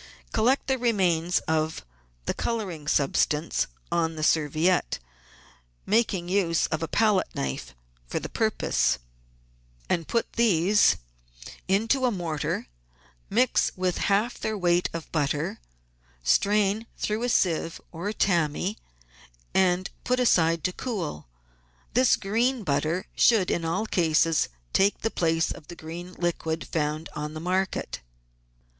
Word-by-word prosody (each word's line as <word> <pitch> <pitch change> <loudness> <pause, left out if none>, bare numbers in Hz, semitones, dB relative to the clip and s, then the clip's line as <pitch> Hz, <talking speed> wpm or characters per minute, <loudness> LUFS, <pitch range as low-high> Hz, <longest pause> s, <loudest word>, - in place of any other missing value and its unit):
Collect 245 +5 +2
the 265 -1 0
remains 180 -7 +2
of 155 - -1 0.4
the - - 0
colouring 190 -10 -3
substance 150 +2 +1 0.2
on 165 -1 +1
the 155 - -4
serviette, 160 +4 +2 0.9
making 200 -5 +1
use 180 -3 +2
of 155 - -2
a 165 - -1
palette 210 +1 +2
knife 65 -2 -4 0.3
for - - -2
the - - -5
purpose, - - +1 0.9
and 170 -3 0
put 230 - -1
these 205 -3 +4 0.7
into 225 +8 +2
a - - +1
mortar; 165 -7 -2 0.6
mix 245 +4 +2
with 185 -1 -1
half 205 +5 +1
their 220 -1 -2
weight 175 -1 +2
of 165 -1 -7
butter, 145 -2 -1 0.6
strain 205 - +2
through 215 +1 -1
a 245 - 0
sieve 165 -6 +1
or 175 +5 -3
tammy, 180 0 0 0.7
and 185 0 +2
put 250 0 +1
aside 165 -9 +3
to 185 - 0
cool. 180 - -4 0.7
This 255 0 +5
green 230 +4 0
butter 160 +2 0
should 215 -6 +4
in 170 - 0
all 175 +6 -1
cases 165 -4 +2 0.2
take 200 +1 +3
the 225 - -1
place 165 -1 +1
of 150 - -9
the 175 - -9 0.4
liquid 165 -2 -1
green - - -8
found 155 0 -1
on 150 +1 -5
the - - -4
market. 185 +3 -1
180 Hz, 125 wpm, -26 LUFS, 160-210 Hz, 0.9 s, This